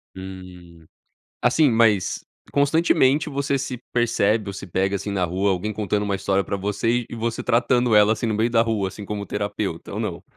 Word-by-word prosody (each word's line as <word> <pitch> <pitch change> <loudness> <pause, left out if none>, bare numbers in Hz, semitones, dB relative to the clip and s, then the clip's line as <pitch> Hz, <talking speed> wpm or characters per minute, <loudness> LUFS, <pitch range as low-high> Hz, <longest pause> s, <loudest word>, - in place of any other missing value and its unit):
Hum. 90 -3 -11 0.6
Assim, 135 +5 +4
mas 110 -5 +2 0.3
constantemente 145 0 +3
você 140 -1 -1
se 135 -1 -4 0.2
percebe 110 -3 +1
ou - - -5
se 95 - -7
pega 95 +3 0
assim 100 +1 -4
na 95 -2 0
rua, 95 +4 0
alguém 100 +4 -2
contando 105 0 -1
uma 100 -1 -1
história 95 0 0
pra - - -3
você 105 +5 -1
e - - -7
você 115 0 -3
tratando 120 0 +2
ela 105 +1 +6
assim, 115 - -4
no 110 - 0
meio 110 +3 +1
da 115 -1 +3
rua, 110 -4 0
assim, 100 +2 -8
como 100 0 -4
terapeuta? 100 -4 -4
Ou 105 - -4
não? 105 -7 -4
105 Hz, 190 wpm, -23 LUFS, 95-120 Hz, 0.6 s, ela